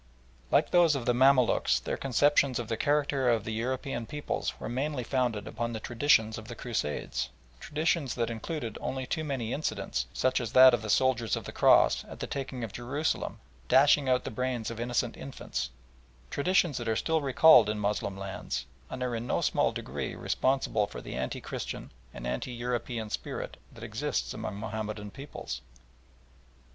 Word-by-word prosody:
Like 150 - +3
those 170 -4 +5
of 130 -4 -3
the 120 - +3
Mamaluks 130 0 +4
their - - -3
conceptions 135 0 +3
of 120 -1 -4
the 115 - 0
character 145 0 +1
of 115 -3 +2
the 110 - -4
European 125 +1 -2
peoples 150 -1 -3
were - - -5
mainly 130 +2 -2
founded 120 -5 -1
upon 115 +1 -3
the 110 - -3
traditions 115 -2 +2
of 110 - -11
the 120 - -7
Crusades 110 -13 -2 0.3
traditions 155 -2 0
that 120 -1 -1
included 115 0 -4
only 130 -1 -3
too 155 +4 -2
many 130 -6 -2
incidents, 65 - -2
such 130 0 +1
as 115 0 -5
that 130 0 +9
of 120 - +1
the 110 - -6
soldiers 120 -1 +2
of - - -5
the - - -7
Cross, - - +5
at - - -11
the - - -3
taking 130 -2 -4
of 110 - -5
Jerusalem, 140 +6 -2 0.3
dashing 140 - +5
out 125 0 +3
the - - -5
brains 120 0 -2
of 115 - -7
innocent 120 0 -1
infants; 90 - -4 0.6
traditions 170 -2 +2
that 120 -1 -3
are 110 - +2
still 160 +6 +1
recalled 135 -4 +7
in 105 - -1
Moslem 100 -1 -1
lands, 95 -10 -4 0.2
and 130 - -4
are 125 -2 -1
in 115 +1 -4
no - - +1
small - - +2
degree - - -5
responsible 130 -6 +1
for - - -8
the - - -8
anti 65 +1 -3
Christian - - -6 0.2
and - - -8
anti 60 - -3
European 120 -2 -3
spirit - - -4 0.2
that - - -12
exists - - -2
among 100 - -5
Mahomedan 105 -1 -4
peoples. 135 - -7
120 Hz, 175 wpm, -29 LUFS, 110-135 Hz, 0.6 s, that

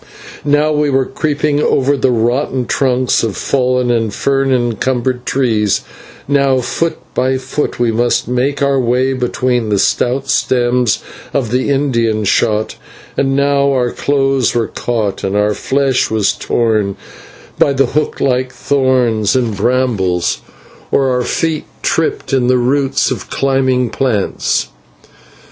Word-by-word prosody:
Now 150 +1 +2
we 150 -1 +1
were 135 -1 +2
creeping 145 +1 -1
over 140 0 +2
the 130 -1 +1
rotten 125 +2 0
trunks 130 -1 +1
of 110 -4 -2
fallen 125 -2 +1
and 115 -3 0
fern 135 +5 0
encumbered 125 +1 -1
trees, 110 -6 +1 0.5
now 140 -2 +2
foot 165 +6 -2 0.2
by 130 +1 +1
foot 135 +2 -3
we 120 -1 +2
must 120 +2 0
make 130 +4 0
our 140 -1 +2
way 125 +2 +1
between 125 -2 -1
the 105 - +1
stout 125 +7 0
stems 125 -4 +1 0.3
of 125 -6 0
the 130 +2 0
Indian 115 -6 +1
Shot, 105 - +1 0.4
and 135 0 +1
now 140 0 +2
our 125 -3 0
clothes 135 -4 0
were 115 -2 0
caught 110 -5 -2
and 95 +1 -1
our 105 0 +2
flesh 135 +2 0
was 110 -3 +1
torn 110 -4 0 0.6
by - - +4
the 135 0 +2
hook 150 +5 -2
like 130 -1 0
thorns 130 -6 +1
and 120 -5 0
brambles, 105 -6 0 0.5
or 135 -1 +2
our 125 0 +1
feet 155 +4 -1 0.2
tripped 160 -3 -1
in 130 -2 +2
the 125 0 +3
roots 135 +2 +1
of - - -5
climbing 130 -3 +1
plants. 115 -7 -1
130 Hz, 140 wpm, -15 LUFS, 120-135 Hz, 0.6 s, by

